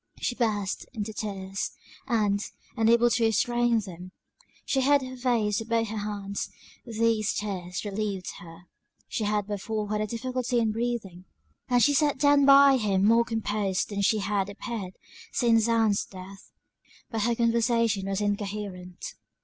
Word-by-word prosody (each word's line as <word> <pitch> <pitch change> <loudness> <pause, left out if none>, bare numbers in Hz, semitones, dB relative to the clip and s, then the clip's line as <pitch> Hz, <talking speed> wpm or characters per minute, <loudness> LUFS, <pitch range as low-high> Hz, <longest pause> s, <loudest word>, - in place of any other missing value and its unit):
She - - -1
burst 210 -5 -1
into 220 -2 -4
tears; 195 -2 -4 0.3
and, 210 -5 +1 0.3
unable 235 +1 +4
to 235 - +2
restrain 240 +1 +2
them, 185 -2 -10 0.5
she 265 - +1
hid 280 +1 +4
her 255 0 -7
face 235 -5 +1
with 225 +1 -8
both 230 -1 +1
her 220 - -4
hands; 200 -1 -4 0.4
these 225 -2 +1
tears 185 -3 -4
relieved 200 -2 -3
her, 165 0 -12 0.5
(she 220 - -2
had 210 -1 0
before 210 +1 -3
had 210 0 0
a 215 - -1
difficulty 250 +2 -2
in 225 -2 +2
breathing,) 215 -6 -3 0.4
and 245 -1 +4
she 290 - +4
sat 290 0 +2
down 285 0 +4
by 275 -1 +8
him 200 -4 +1
more 230 +2 +5
composed 210 -4 -1
than 200 -1 -2
she 210 +2 +3
had 200 -1 -1
appeared 200 -2 -6 0.4
since 230 -1 +3
Ann's 225 -3 +2
death; 190 +1 -12 0.6
but 225 -2 -1
her 235 +2 +1
conversation 230 -3 +1
was 195 +1 -1
incoherent. 200 -3 -4
215 Hz, 150 wpm, -27 LUFS, 200-235 Hz, 0.6 s, by